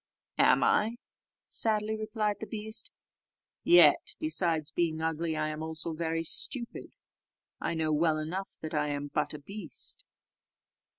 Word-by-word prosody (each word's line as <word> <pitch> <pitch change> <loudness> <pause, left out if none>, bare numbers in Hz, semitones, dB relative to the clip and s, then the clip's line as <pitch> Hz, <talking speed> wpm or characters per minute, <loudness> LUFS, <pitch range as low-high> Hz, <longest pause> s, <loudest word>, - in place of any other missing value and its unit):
"Am - - +5
I?" 220 +2 +2 0.5
sadly 215 -1 +1
replied 215 -1 -2
the 220 - -6
beast; 220 0 -2 0.7
"yet, 350 - +6
besides 170 - +1
being 165 -2 0
ugly, 160 0 -1
I 155 0 0
am 155 0 -5
also 160 +1 -4
very 165 0 -2
stupid: 235 - 0 0.6
I - - -2
know 160 -1 0
well 155 0 +2
enough 175 +6 -4
that 155 - -6
I 150 -1 +1
am 145 0 -3
but - - -1
a - - -7
beast." 195 +3 -3
165 Hz, 135 wpm, -30 LUFS, 155-215 Hz, 0.7 s, yet